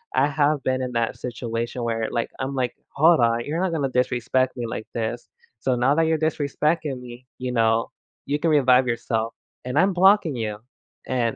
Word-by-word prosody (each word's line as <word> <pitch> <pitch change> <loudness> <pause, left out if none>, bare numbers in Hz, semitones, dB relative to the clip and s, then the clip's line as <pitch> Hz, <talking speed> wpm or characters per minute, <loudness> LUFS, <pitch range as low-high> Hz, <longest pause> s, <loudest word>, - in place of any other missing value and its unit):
I - - +4
have 145 0 +1
been 130 0 0
in 125 -1 -3
that 115 -1 0
situation 120 0 -4
where 115 -1 -1
like, 115 -1 -1
I'm 135 +1 -3
like, 125 -2 -1
"Hold 160 +2 +4
on, 115 0 +2
you're 160 +4 -2
not 190 -2 0
gonna 150 -4 0
disrespect 130 +1 0
me 120 - -3
like 110 - -5
this, 115 +1 -3 0.3
so 125 +2 0
now 125 +4 +2
that 165 - +3
you're 160 0 +2
disrespecting 150 -1 -1
me, 125 0 -11
you 125 0 -3
know, 115 -1 +2 0.3
you 145 +1 -1
can 165 - +1
revive 130 -3 +4
yourself 115 -1 -1 0.3
and 125 +2 -3
I'm 190 +2 +3
blocking 185 -4 +4
you," 110 -3 -3 0.5
and 120 -3 0
125 Hz, 190 wpm, -23 LUFS, 120-145 Hz, 0.5 s, I